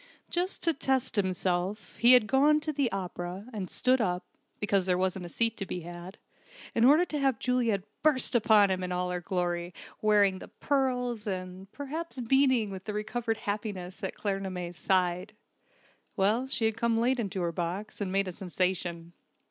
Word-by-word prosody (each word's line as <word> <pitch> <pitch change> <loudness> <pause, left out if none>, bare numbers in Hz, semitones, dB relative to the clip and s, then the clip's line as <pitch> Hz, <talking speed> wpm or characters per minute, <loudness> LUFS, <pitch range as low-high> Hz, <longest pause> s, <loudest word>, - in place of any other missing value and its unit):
Just 360 +2 0
to 330 - +3
test 265 -3 0
himself 185 0 -1
he 240 +2 +8
had 250 -3 +7
gone 285 +6 +4
to 310 0 -2
the 275 -4 0
opera, 185 0 -5
and 195 -4 -4
stood 255 0 +2
up 180 -4 -1 0.3
(because 200 -2 +1
there 180 -1 +2
wasn't 185 -1 -1
a - - -10
seat 230 +4 0
to 195 - -3
be 180 - -4
had) 175 +3 -9 0.6
in 230 - +2
order 305 +7 +6
to 300 -4 -3
have 270 -4 +2
Juliet 235 -6 0 0.2
burst 295 -4 +3
upon 215 -4 +5
him 185 0 -1
in 180 0 -3
all 180 0 -1
her 180 0 -3
glory, 175 -1 -2 0.3
wearing 205 -3 +3
the - - -10
pearls, 250 -5 -1
and, 185 0 -5
perhaps, 290 +1 -6
beaming 250 -3 +3
with 190 +2 -8
recovered 225 +2 -2
happiness 205 -3 -5
at 190 - -3
Claremanagh's 190 -3 -3
side. 185 +2 0 0.8
Well, 215 +7 +2
she 240 -3 0
had 220 0 0
come 230 0 +1
late 250 +3 +2
into 195 -4 -2
her 170 -1 0
box, 180 +6 -4
and 190 -2 -2
made 195 0 +1
a 185 - -5
sensation. 175 -2 -3
205 Hz, 175 wpm, -29 LUFS, 185-245 Hz, 0.8 s, he